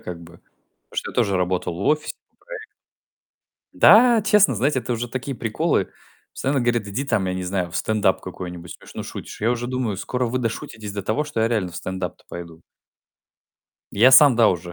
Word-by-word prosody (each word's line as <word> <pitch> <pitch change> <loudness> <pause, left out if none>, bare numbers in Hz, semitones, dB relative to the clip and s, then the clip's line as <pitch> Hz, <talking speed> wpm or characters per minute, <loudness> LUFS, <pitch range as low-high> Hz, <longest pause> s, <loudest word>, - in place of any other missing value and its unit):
как 85 -1 -8
бы. 85 +1 -14 0.5
Потому - - -16
что - - -4
я - - -16
тоже 100 -1 +1
работал 90 -1 -1
в 85 - -8
офисе 150 0 0 0.2
по - - -43
проектам. 475 -3 -8 1.1
Да, 235 0 +6
честно, 205 - +4
знаете, 130 +5 +1
это 125 - -4
уже 120 +1 -3
такие 130 +2 -5
приколы. 115 -2 -1 0.4
Постоянно 135 0 -1
говорят: 120 -3 0
"Иди 120 +8 -3
там, 115 -8 0
я 90 - -2
не 95 - -4
знаю, 90 -1 -2
в - - -5
стендап 105 -3 +1
какой-нибудь. 90 -2 -8
Смешно - - -9
шутишь." - - -9
Я 110 +3 +1
уже 120 0 -2
думаю: 125 -5 -2
"Скоро 125 +6 -2
вы 125 +2 -2
дошутитесь 110 -3 -5
до 100 -1 -4
того, 125 +9 -1
что 145 -6 -4
я 115 - +2
реально 105 -6 -1
в - - -8
стендап-то 95 0 -5
пойду." 85 -1 -9 1.3
Я 120 +6 +5
сам, 135 -2 +8
да, 115 -2 +5
уже 90 -1 -3
110 Hz, 195 wpm, -22 LUFS, 95-130 Hz, 1.3 s, сам